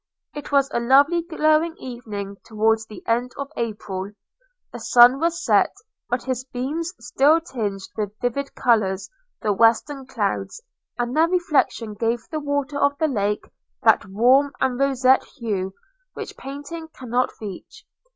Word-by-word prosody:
It 295 0 -8
was 275 -1 +4
a - - 0
lovely 280 +8 +4
glowing 320 0 +1
evening, 210 -6 -7
towards 220 0 +1
the 215 - -11
end 240 +2 0
of 280 +1 -5
April. 205 -3 -4 0.3
– - - -43
The 240 - -6
sun 240 +3 +6
was 340 +1 -1
set, 210 - +3 0.3
but 245 0 -1
his 255 -1 -2
beams 275 +7 -3
still 280 +6 +3
tinged 210 - -4
with 210 -1 -4
vivid 270 +3 -2
colours 205 - +1 0.3
the 210 - +2
western 235 +6 +2
clouds, - - -2 0.4
and 240 +1 -2
their 320 +2 +5
reflection 310 -10 +1
gave 230 +2 -2
the 310 - -2
water 285 -1 -2
of 285 0 +2
the 315 - +2
lake 210 -6 -1 0.4
that - - +5
warm 255 +8 +3
and 260 -1 0
roseate 265 -1 +3
hue 195 -6 -3 0.4
which - - -7
painting 290 +5 -7
cannot 250 0 0
reach. 200 -4 -9
250 Hz, 150 wpm, -23 LUFS, 220-285 Hz, 0.4 s, sun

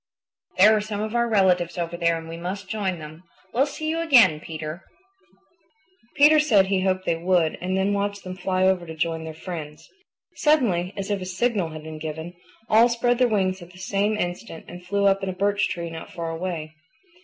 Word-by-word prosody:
There 210 +4 +7
are 210 - +1
some 210 -1 -5
of 215 +1 -3
our 235 0 +1
relatives 185 -5 +2
over 170 0 -3
there 170 -1 +1
and 165 0 -8
we 165 - -7
must 185 +4 -5
join 195 -4 -2
them. 155 +1 -10 0.3
We'll 270 +4 +3
see 310 +2 -5
you 325 +1 -1
again, 240 - +5
Peter." 155 +2 -7 1.3
Peter 305 +1 +6
said 220 -11 +4
he 190 -1 0
hoped 185 0 0
they 165 - +1
would 170 -2 +1
and 185 +1 -1
then 195 +1 +1
watched 200 0 -2
them 185 0 -6
fly 185 0 -1
over 185 -2 +1
to 160 - -7
join 160 0 -2
their 160 -1 -7
friends. 160 -3 -8 0.5
Suddenly, 220 - +2
as 195 +1 -3
if 200 -2 -1
a - - -4
signal 190 -1 0
had 155 -1 -9
been 155 0 -8
given, 160 +2 -6 0.3
all 225 +3 +5
spread 240 +1 +1
their 250 - +5
wings 190 -4 0
at 175 +1 -13
the - - -15
same 200 +3 0
instant 175 -1 -5
and 180 +1 -10
flew 200 +2 0
up 195 0 +3
in 195 - -2
a - - -3
birch 200 +2 +1
tree 170 -1 -5
not 165 0 -8
far 165 -1 -4
away. 165 -2 -4
185 Hz, 210 wpm, -24 LUFS, 170-205 Hz, 1.3 s, There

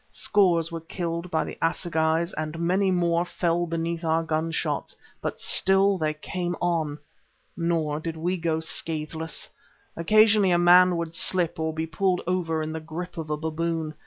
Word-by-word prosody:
Scores 175 -5 +2
were 165 -1 -5
killed 170 +1 -4
by 160 -2 0
the - - -8
assegais, 165 0 0
and 155 +1 -4
many 185 +3 +1
more 170 -2 +2
fell 175 -1 -1
beneath 165 0 -3
our 165 0 +1
gun 160 0 -1
shots; 165 - -3 0.3
but - - -4
still 195 0 +4
they 155 -1 -1
came 175 +3 -4
on. 160 -4 -1 0.6
Nor 165 -3 -1
did 160 0 -5
we 175 +3 -1
go 165 -2 -1
scathless. 160 0 -1 0.5
Occasionally 215 +3 +4
a 175 - +4
man 180 +1 +6
would 165 -1 -4
slip, 180 -2 0
or 160 0 -1
be 160 +1 -3
pulled 180 +3 0
over 165 -3 -1
in 155 0 -4
the 160 - -4
grip 165 +3 -7
of 155 -1 -6
a 150 - -1
baboon. 160 0 -2
165 Hz, 165 wpm, -25 LUFS, 160-175 Hz, 0.6 s, man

